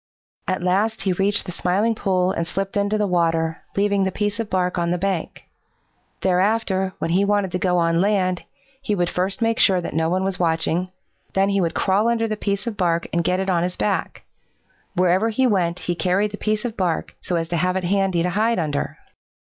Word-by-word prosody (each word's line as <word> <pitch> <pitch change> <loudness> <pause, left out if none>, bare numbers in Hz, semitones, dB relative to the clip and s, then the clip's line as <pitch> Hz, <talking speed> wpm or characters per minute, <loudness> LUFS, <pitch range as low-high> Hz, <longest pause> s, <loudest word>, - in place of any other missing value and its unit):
At 185 -1 -1
last 200 +5 +1
he 190 -2 +1
reached 195 +3 +1
the 180 - -5
Smiling 195 +6 +1
Pool 185 -4 +1
and 170 -2 -2
slipped 195 +2 -3
into 205 +1 +1
the 210 - +1
water, 165 -3 0 0.2
leaving 200 0 +2
the 190 - 0
piece 205 +2 -2
of 225 -2 -3
bark 180 -1 0
on 170 0 0
the 175 - +1
bank. 190 -2 -3 0.8
Thereafter, 190 0 +1
when 165 - -2
he 185 +3 +3
wanted 200 -2 +1
to 180 - -2
go 180 -1 +1
on 165 0 +2
land, 185 -3 +1 0.4
he 215 -7 -1
would 175 -2 0
first 190 +5 -1
make 225 0 +1
sure 190 -3 +5
that 175 - -5
no 160 0 +1
one 185 +2 0
was 190 -1 -1
watching. 170 +1 0 0.5
Then 195 +1 +3
he 200 -1 +1
would 170 -2 -1
crawl 200 +4 +2
under 230 -1 +1
the 215 - -2
piece 200 -1 -2
of 235 -3 -3
bark 170 -2 +1
and 170 0 +1
get 180 +3 +1
it 190 - -2
on 175 -3 +2
his 180 +1 -2
back. 105 - -2 0.7
Wherever 185 +5 +3
he 260 +4 +1
went 180 -7 +1
he 175 0 -2
carried 190 +4 +1
the - - -5
piece 215 +2 -1
of 230 -2 -3
bark 180 -6 -2
so 180 - -2
as 165 -1 -1
to 175 - -1
have 180 +2 +1
it 190 - -1
handy 190 -2 +1
to 180 - 0
hide 220 +4 +1
under. 150 -4 -2
185 Hz, 220 wpm, -22 LUFS, 175-205 Hz, 0.8 s, sure